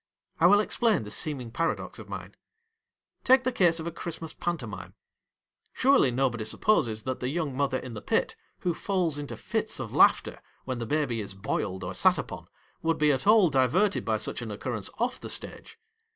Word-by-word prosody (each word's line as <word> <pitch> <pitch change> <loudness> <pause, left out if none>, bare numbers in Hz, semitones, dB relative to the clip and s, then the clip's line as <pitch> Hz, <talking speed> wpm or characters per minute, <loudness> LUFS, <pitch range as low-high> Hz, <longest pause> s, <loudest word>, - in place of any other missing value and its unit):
I 170 - +6
will 205 +3 +6
explain 215 - +1
this 105 0 -3
seeming 130 -7 -3
paradox 165 +7 -2
of - - -11
mine. - - -7 0.9
Take 260 0 +5
the 255 - +1
case 175 -7 +3
of 160 - -5
a 170 - -3
Christmas 165 -1 -6
Pantomime. 120 - -5 0.8
Surely 265 - +4
nobody 120 -2 0
supposes 110 - +1
that 130 +1 -3
the 125 - -2
young 150 -3 -2
mother 135 -1 0
in 130 -2 -7
the 105 - -7
pit - - 0 0.3
who 175 - 0
falls 175 -6 -1
into 145 - -6
fits - - -2
of - - -5
laughter - - +4 0.2
when 130 -2 -3
the 115 - -4
baby 140 -6 0
is 100 -1 -7
boiled 95 0 -3
or - - -4
sat - - +4
upon, - - -6 0.3
would 165 0 +1
be 150 -1 +4
at 135 +7 -1
all 210 -6 +6
diverted 140 - +2
by 110 -1 0
such 110 - -4
an 115 - -5
occurrence 105 0 -4
off 245 +2 -1
the - - -8
stage. - - -5
145 Hz, 190 wpm, -28 LUFS, 120-175 Hz, 0.9 s, I